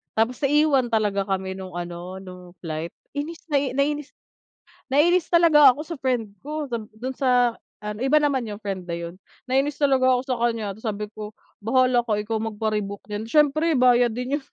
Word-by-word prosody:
tapos 225 +3 +1
naiwan 290 -2 +3
talaga 210 -3 0
kami 190 -1 -3
nung 185 -2 -8
ano, 175 +1 -6
nung 180 -1 -12
flight 160 0 -4 0.2
inis 305 +3 -5
na 285 - +4 1.3
nainis 340 +5 +3
talaga 310 -5 +7
ako 270 - -9
sa 335 +1 -6
friend 250 -5 -1 0.2
ko, 300 0 -4
sab- 235 -3 -4 0.2
dun 260 +1 -4
sa 245 -3 +2 0.2
ano, 210 0 -5
iba 300 +3 +4
naman 280 -4 +1
yung 210 -2 -7
friend 195 -3 -4
na 175 - -6
'yon. 170 +1 -7 0.3
Nainis 275 +3 0
talaga 265 -2 +4
ako 250 0 +1
sa 255 - 0
kanya 225 -4 -1
tapos 220 - -18
sabi 210 -2 -2
ko, 210 0 -7 0.3
"Bahala 255 +1 +3
ka 220 -3 0
ikaw 220 +2 -3
magpa-rebook 210 -2 -3
niyan," 210 +1 -4
siyempre 300 +6 +3
bayad 245 -2 +4
din 250 +4 -2
'yon. 290 - -8
240 Hz, 180 wpm, -24 LUFS, 205-275 Hz, 1.3 s, talaga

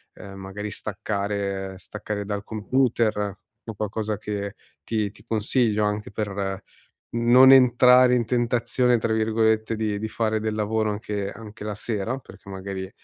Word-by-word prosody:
ehm, 100 -1 -10
magari 95 +2 -6
staccare, 100 -2 -3
staccare 105 +1 -5
dal 100 0 -3
computer 115 0 +1 0.5
o 115 - -3
qualcosa 105 +1 -2
che 100 -1 -4 0.3
ti 105 -3 -1
ti 110 - -18
consiglio 110 -1 +1
anche 105 0 -2
per 100 -2 -3 0.5
non 120 +3 +7
entrare 125 -1 +6
in 120 -2 +1
tentazione 120 0 +1
tra 110 0 -1
virgolette 110 0 +1
di 105 -2 -1
di 110 +1 -3
fare 110 -1 -1
del 110 0 -2
lavoro 110 0 0
anche 105 -1 -3
anche 110 -1 -10
la 105 -1 -3
sera 110 +3 -3
perché 100 -6 -15
magari 95 0 -6
110 Hz, 145 wpm, -24 LUFS, 100-115 Hz, 0.5 s, non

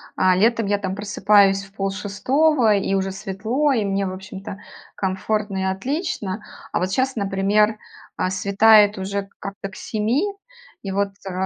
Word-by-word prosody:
а, 185 -1 +3
летом 225 +2 +2
я, 205 0 +2
там, 190 -2 -4
просыпаюсь 200 -1 +3
в 195 0 -16
полшестого, 215 +6 +1
и 195 -1 0
уже 195 0 0
светло, 215 +9 -1
и 225 -4 +1
мне, 195 0 0
в 185 - -3
общем-то, 195 +1 -8 0.4
комфортно 195 +1 -2
и 190 - -1
отлично. 205 - -3 0.3
А, - - 0
вот, 185 +1 -1
щас, 260 +5 0
например, 205 +1 +1 0.4
а, - - 0
светает 205 +2 +5
уже 195 +1 -3
как-то 195 0 -6
к 190 - -14
7, 225 - -1 0.6
и, 195 - -4
вот, 200 +1 0 0.2
э, - - -4
200 Hz, 155 wpm, -22 LUFS, 195-215 Hz, 0.6 s, светает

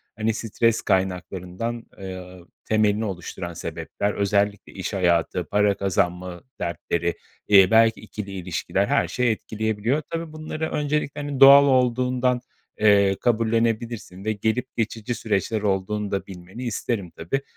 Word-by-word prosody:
hani, 110 0 0
stres 115 +1 0
kaynaklarından, 95 +4 -2
eee, 95 -1 -8 0.3
temelini 110 0 +2
oluşturan 90 -2 -5
sebepler. 85 +5 -3
Özellikle 100 0 0
iş 95 +2 -5
hayatı, 90 -2 +1
para 105 0 +3
kazanma 90 -2 -1 0.2
dertleri, 85 0 -2 0.3
eee, 95 -2 +7
belki 115 -1 +5
2'li 105 -2 -7
ilişkiler, 95 +1 -1
her 140 - +1
şey 125 -2 +1
etkileyebiliyor. 110 +5 -1
Tabii, 165 -1 -4
bunları 155 0 -4
öncelikle, 150 0 -1
hani, 145 -2 -4
doğal 140 +1 +10
olduğundan, 125 -1 +2 0.4
eee, 100 -2 +5
kabullenebilirsin 115 -3 0
ve 110 - +1
gelip 110 +5 -1
geçici 115 +1 -2
süreçler 110 -1 -1
olduğunu 100 +1 -1
da 100 - -2
bilmeni 95 +5 -9
isterim 110 -5 -3
tabii. 90 +13 -2
105 Hz, 125 wpm, -24 LUFS, 95-120 Hz, 0.4 s, doğal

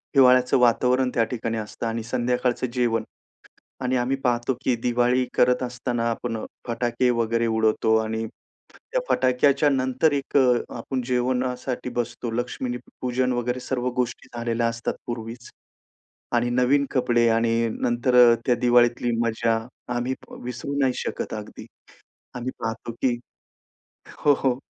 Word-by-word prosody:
हिवाळ्याचं 125 -1 +6
वातावरण 125 +2 +3
त्या 115 - +3
ठिकाणी 115 -1 -2
असतं 110 +2 -5
आणि 115 0 -3
संध्याकाळचं 125 +1 0
जेवण. 120 -2 +1 0.8
आणि 130 0 0
आम्ही 125 +2 0
पाहतो 120 +1 +1
की 125 - +2
दिवाळी 125 +1 +2
करत 125 +1 +3
असताना 120 -1 -2
आपण 115 0 -3 0.3
फटाके 120 +1 0
वगैरे 115 -1 +1
उडवतो 110 0 +2
आणि 110 +1 -3 0.5
त्या - - -4
फटाक्याच्या 140 +3 +3
नंतर 130 +3 +2
एक 140 0 -1
अ, 125 -2 +5 0.2
आपण 130 +2 -3
जेवणासाठी 125 0 -1
बसतो. 120 -1 -3
लक्ष्मी 120 +1 -3 0.2
पूजन 125 0 0
वगैरे 125 +1 -1
सर्व 125 -1 -2
गोष्टी 125 -2 -2
झालेल्या 115 0 0
असतात 115 0 -2
पूर्वीच. 115 0 -6 0.8
आणि 120 0 +1
नवीन 125 +3 +3
कपडे 120 -2 +2
आणि 115 0 +2
नंतर 120 +1 +1
अ, 120 -1 +8
त्या 125 - +3
दिवाळीतली 120 0 +3
मजा 115 0 +1 0.4
आम्ही 125 +2 -1 0.3
विसरू 125 +3 -5
नाही 130 -2 +2
शकत - - -4
अगदी. - - -7 0.7
आम्ही 125 +1 -3
पाहतो 115 +1 -4
की 125 -2 +2 1.0
हो, 145 - +4
हो, 130 -2 +1
120 Hz, 135 wpm, -24 LUFS, 115-125 Hz, 1.0 s, अ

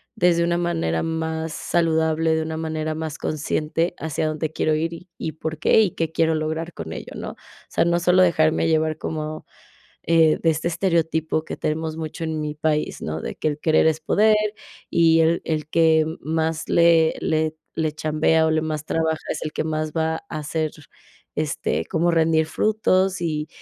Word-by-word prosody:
desde 175 -5 +3
una 170 0 +1
manera 165 - -1
más 160 0 -2
saludable, 160 -1 +1
de 160 - 0
una 160 0 -4
manera 155 -1 -3
más 160 -1 -4
consciente, 155 +2 -1
hacia 155 0 -2
dónde 155 0 -2
quiero 155 0 0
ir 165 +2 -1
y 175 +2 -11
y 160 - -4
por 160 0 -5
qué 220 - +5
y 195 -6 +2
qué 165 -1 -2
quiero 160 -1 +2
lograr 160 +2 -3
con 80 -1 -6
ello, - - -8
¿no?, - - -5
o - - -14 0.3
sea, - - +2
no 170 0 +2
solo 180 +1 +4
dejarme 160 -1 +3
llevar 155 -1 +1
como, 155 0 -5 0.6
eh, 165 -2 +4
de 165 - +3
este 160 +2 -2
estereotipo 160 -3 0
que - - -6
tenemos 160 +1 -2
mucho 160 +1 -5
en 160 -1 -2
mi 150 0 -4
país, 150 0 -1
¿no?, 80 +1 -4
de - - -5
que - - -2
el 150 0 -4
querer 160 0 +3
es 160 0 +1
poder 215 +6 +4 0.5
y 165 -1 +4
el 165 +1 +2
el 155 -2 -2
que 160 -1 +4 0.2
más 160 0 -2
le 170 -1 +4
le 155 0 0 0.2
le 155 -1 0
chambea 155 +1 +2
o - - +1
le 155 0 +2
más 155 -1 -3
trabaja 160 -1 0
es 155 - -3
el 155 - -4
que - - -1
más 155 -1 -2
va 160 0 0
a 155 - -4
hacer, 155 +1 -2 0.6
este, 155 0 -1
como 170 -1 +1
rendir 160 -1 +3
frutos 190 0 +1
y 155 -2 -2
160 Hz, 190 wpm, -23 LUFS, 155-165 Hz, 0.6 s, qué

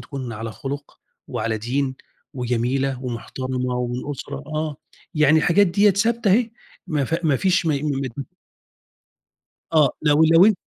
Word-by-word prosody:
تكون 125 -1 -6
على 110 0 -5
خُلُق 140 +3 -7 0.3
وعلى 110 -1 -2
دين 130 +4 -1 0.4
وجميلة 125 +2 -1
ومحترمة 125 +1 -3
ومن 125 +3 -3
أسرة 140 +1 -6
آه. 155 -1 -3 0.4
يعني 150 +1 +5
الحاجات 190 +6 +4
ديّة 200 +4 +4
ثابتة 225 +1 +2
أهي، 230 +2 +3 0.4
ما 145 -3 0
ف 165 +5 -2
ما 145 -4 +3
فيش 185 +2 +1
م - - +3
ممت 140 -3 -2 1.5
آه. 150 -4 +5
لو 150 0 +4
لو 165 +7 +6
140 Hz, 135 wpm, -22 LUFS, 125-160 Hz, 1.5 s, لو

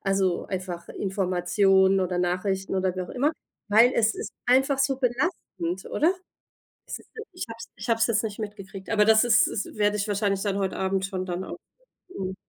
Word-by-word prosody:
also, 195 -2 0
einfach 180 -3 -5
Informationen 190 0 +2
oder 180 -1 -1
Nachrichten 190 +2 -1
oder 190 -1 0
wie 185 - -1
auch 180 - -8
immer, 280 +4 +1 0.4
weil 230 +5 +6
es 220 -1 +2
ist 220 - -6
einfach 265 +2 +3
so 270 0 +2
belastend, 240 - -2
oder? 330 +5 +3 0.7
Siehst - - -8
du, 445 - -7
ich 360 - -5
habe 225 - -7
es 230 - -9
ich 215 - -8
habe 230 -1 +2
es 225 - +5
jetzt 220 -2 +1
nicht 210 -2 -4
mitgekriegt, 195 -2 -8
aber 210 -2 +4
das 220 +1 +5
ist 240 - +5
ist 205 - -4
werde 210 0 +2
ich 205 +1 -2
wahrscheinlich 200 -1 0
dann 200 -2 -1
heute 190 -1 -1
Abend 190 0 0
schon 185 -2 -4
dann 180 +1 -3
auch - - -7 0.6
mhm. 190 -1 -3
195 Hz, 195 wpm, -26 LUFS, 190-225 Hz, 0.7 s, weil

